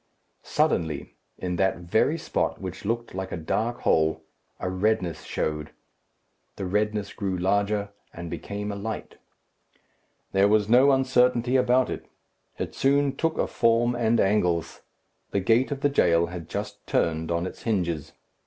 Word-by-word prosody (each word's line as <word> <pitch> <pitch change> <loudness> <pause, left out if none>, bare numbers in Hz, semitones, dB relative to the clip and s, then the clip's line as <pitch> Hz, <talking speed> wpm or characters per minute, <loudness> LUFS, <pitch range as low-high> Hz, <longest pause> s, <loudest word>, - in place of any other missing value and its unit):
Suddenly, 80 -4 0 0.2
in 90 -1 -3
that 95 +1 +2
very 100 - +1
spot 160 - -1
which 95 +1 -7
looked 115 +2 -2
like 95 0 -4
a - - -3
dark 110 +9 -2
hole, 80 0 +2 0.4
a - - -3
redness 95 -2 0
showed. 75 -1 -2 0.9
The 95 - -4
redness 105 +1 -1
grew 95 -2 -2
larger, 100 +2 +1 0.2
and 85 0 -7
became 100 +5 -5
a - - -4
light. 105 +2 -5 1.1
There 95 +1 +4
was 105 0 +3
no 130 +5 +6
uncertainty 125 -2 +3
about 125 0 +3
it. - - -6 0.5
It - - -4
soon 140 0 +2
took 165 +2 0
a - - +2
form 115 +1 +2
and 115 -1 +2
angles. 90 -5 +1 0.5
The 100 - 0
gate 115 +7 +3
of 140 -2 -4
the 145 - +4
jail 85 -11 +3
had 85 -1 -8
just - - -5
turned 80 0 0
on 85 +1 0
its 95 - -7
hinges. 85 -9 -1
100 Hz, 150 wpm, -26 LUFS, 90-120 Hz, 1.1 s, no